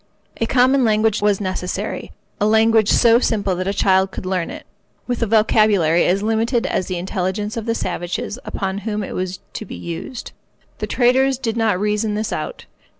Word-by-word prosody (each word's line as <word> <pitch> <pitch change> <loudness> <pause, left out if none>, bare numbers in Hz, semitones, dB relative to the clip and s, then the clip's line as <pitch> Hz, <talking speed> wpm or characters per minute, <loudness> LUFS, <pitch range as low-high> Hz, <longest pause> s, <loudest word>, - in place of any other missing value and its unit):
A 230 - -1
common 260 +2 +3
language 220 -1 +2
was 205 -1 +2
necessary—a 185 +1 -4
language 220 0 +4
so 235 0 +5
simple 205 -6 0
that 185 +1 -3
a - - +1
child 190 -1 +2
could 190 - -8
learn 185 -2 -1
it, - - -9 0.4
with 245 -1 -3
a 230 - +1
vocabulary 210 -6 +3
as 195 +3 +1
limited 225 +2 +1
as 185 - -1
the 185 - -3
intelligence 190 +3 -3
of 230 -1 -5
the 230 - +1
savages 180 +4 -3
upon 195 0 -3
whom 210 0 -3
it - - -6
was 185 0 -4
to - - -5
be - - -8
used. 170 +8 -7 0.5
The - - -3
traders 260 +1 +3
did 230 -3 -3
not 220 -5 +1
reason 210 +1 0
this 215 +1 -2
out. - - -5
210 Hz, 180 wpm, -20 LUFS, 190-230 Hz, 0.5 s, so